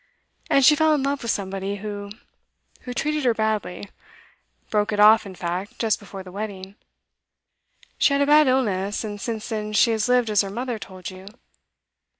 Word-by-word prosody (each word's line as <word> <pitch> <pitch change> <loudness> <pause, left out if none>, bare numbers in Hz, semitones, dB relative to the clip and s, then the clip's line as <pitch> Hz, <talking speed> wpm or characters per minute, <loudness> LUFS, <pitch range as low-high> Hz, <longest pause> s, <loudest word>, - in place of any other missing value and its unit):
And 275 -1 +4
she 300 - +7
fell 315 +1 +3
in 280 - -1
love 280 0 -1
with 235 - -4
somebody 195 0 -2
who 205 0 -6 0.8
who 250 - -5
treated 300 +1 -1
her 240 -3 +2
badly; 215 -3 -2 0.8
broke 210 0 +1
it 210 - -2
off, 215 0 +6
in 190 - -10
fact, 180 +3 -4
just 225 -2 0
before 195 -2 -9
the 185 - -12
wedding. 195 -1 -6 1.3
She 280 - +4
had 280 - +2
a - - +2
bad 300 0 +5
illness, 205 -7 0
and 205 -2 -6
since 225 -1 -4
then 215 -2 -4
she 230 +2 +4
has 220 +1 0
lived 250 -3 +3
as 210 - +4
her 200 - -4
mother 240 +2 -4
told 185 -1 -8
you. 185 +1 -12
215 Hz, 180 wpm, -23 LUFS, 195-250 Hz, 1.3 s, she